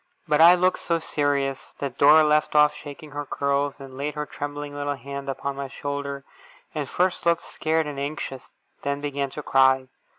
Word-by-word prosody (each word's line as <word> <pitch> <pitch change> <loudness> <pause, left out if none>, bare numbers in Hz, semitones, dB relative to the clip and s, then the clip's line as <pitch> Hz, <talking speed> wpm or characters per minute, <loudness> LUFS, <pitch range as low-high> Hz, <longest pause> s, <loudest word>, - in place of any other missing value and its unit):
But 150 +1 +3
I 170 +2 +9
looked 185 +1 +2
so 170 - 0
serious, 145 -3 -1
that 140 -3 -5
Dora 150 +2 +8
left 150 0 +2
off 150 0 +6
shaking 145 +1 -10
her 145 0 -4
curls, 140 0 -1
and 135 -1 -10
laid 145 +2 -3
her 150 0 -3
trembling 145 0 -6
little 145 0 -2
hand 140 +1 -7
upon 140 +1 -3
my 140 0 -4
shoulder, 140 0 -5 0.5
and 145 -4 -3
first 180 0 0
looked 170 -1 +2
scared 160 0 -1
and 145 -2 -5
anxious, 140 -2 -5 0.3
then 140 0 -2
began 140 -1 -2
to 150 +3 -7
cry. 130 -1 +3
145 Hz, 185 wpm, -25 LUFS, 140-150 Hz, 0.5 s, I